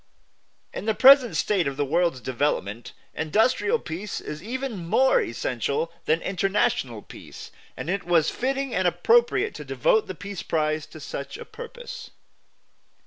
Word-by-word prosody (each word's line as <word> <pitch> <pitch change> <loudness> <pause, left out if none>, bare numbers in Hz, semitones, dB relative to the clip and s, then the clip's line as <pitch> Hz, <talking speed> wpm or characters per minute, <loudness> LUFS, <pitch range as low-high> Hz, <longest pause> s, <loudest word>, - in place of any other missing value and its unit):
In - - -5
the 220 -1 +1
present 265 -1 +7
state 190 -7 +1
of 140 -1 -4
the 145 - +1
world's 165 -2 +1
development 120 -5 -2 0.2
industrial 220 - +2
peace 195 - -5
is 150 0 -7
even 240 -2 -4
more 240 +10 +3
essential 125 +7 -2
than 160 +1 +1
international 180 - 0
peace; - - -11 0.3
and - - -6
it 195 +2 -1
was 170 -2 +2
fitting 270 +1 -2
and 185 0 +2
appropriate 450 - +3
to - - -8
devote - - +1
the 185 - -6
peace 200 +1 -7
prize 155 -1 -1
to 155 - -12
such 140 -1 -6
a - - -9
purpose. 485 +1 -9
180 Hz, 145 wpm, -25 LUFS, -, 0.3 s, present